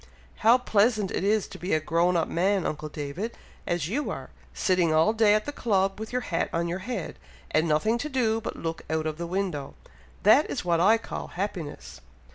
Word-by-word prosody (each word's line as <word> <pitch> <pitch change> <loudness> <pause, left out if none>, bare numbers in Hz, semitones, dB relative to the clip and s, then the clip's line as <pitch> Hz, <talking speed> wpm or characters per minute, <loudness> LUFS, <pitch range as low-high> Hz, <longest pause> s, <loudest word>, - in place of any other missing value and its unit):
How 230 +3 +6
pleasant 215 -4 +2
it - - -2
is 210 +1 +2
to - - -10
be 180 -2 0
a - - +2
grown 170 +3 +2
up 165 - +1
man, 190 +2 +1
uncle 155 0 -3
David, 150 +10 -5 0.3
as 175 -3 0
you 275 - -2
are, - - -6 0.2
sitting 180 -3 +1
all 160 +7 +4
day 220 -2 +4
at 215 - 0
the 290 - -3
club 195 -7 0
with 220 - -6
your 250 0 0
hat 170 -5 -1
on 170 +1 -1
your 175 +2 -3
head, 205 -4 -5 0.3
and 160 +2 +2
nothing 215 +10 +2
to 300 - -3
do 225 -5 +1
but - - -5
look 165 0 -4
out 160 0 -1
of 155 0 -3
the 170 - -3
window. 175 -6 -3 0.5
That - - +6
is - - -3
what 170 -1 +2
I 210 +6 +5
call 225 - -6
happiness!" 175 - -5
185 Hz, 210 wpm, -27 LUFS, 165-220 Hz, 0.5 s, How